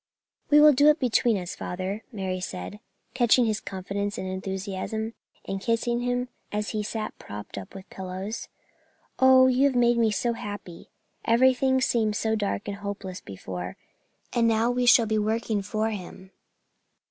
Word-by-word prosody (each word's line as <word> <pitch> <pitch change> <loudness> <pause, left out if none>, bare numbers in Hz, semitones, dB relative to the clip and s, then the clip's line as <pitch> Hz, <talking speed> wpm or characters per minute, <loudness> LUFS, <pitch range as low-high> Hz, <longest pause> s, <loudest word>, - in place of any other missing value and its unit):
"We 295 0 +7
will 300 0 +8
do 285 +3 +5
it 300 0 +6
between 240 -3 +2
us, 180 -2 -5
father," 190 +4 -4
Mary 190 -4 -3
said, 185 +2 -6 0.3
catching 245 -1 +4
his 215 -2 0
confidence 200 +2 -4
and 190 - -4
enthusiasm, 190 +4 -4 0.3
and 195 0 -4
kissing 235 +2 0
him 245 +1 -1 0.2
as 210 0 -2
he 215 - -2
sat 215 +1 -4
propped 105 0 -8
up 100 - -8
with 190 -1 -10
pillows. 190 +3 -5 0.7
"Oh, 260 0 +7
you 260 +1 +4
have 270 - -1
made 240 -1 +4
me 225 -1 +4
so 235 +3 0
happy. 205 -6 -8 0.4
Everything 260 +2 +4
seemed 225 -5 +1
so 220 0 0
dark 205 -1 -2
and 200 -1 -4
hopeless 200 -2 -6
before, 90 -2 -7 0.6
and 235 -1 +3
now 225 +1 +2
we 245 0 0
shall 240 -1 +7
be 215 0 0
working 220 0 0
for 215 +2 -1
him." 190 -1 -8
215 Hz, 160 wpm, -26 LUFS, 190-240 Hz, 0.7 s, will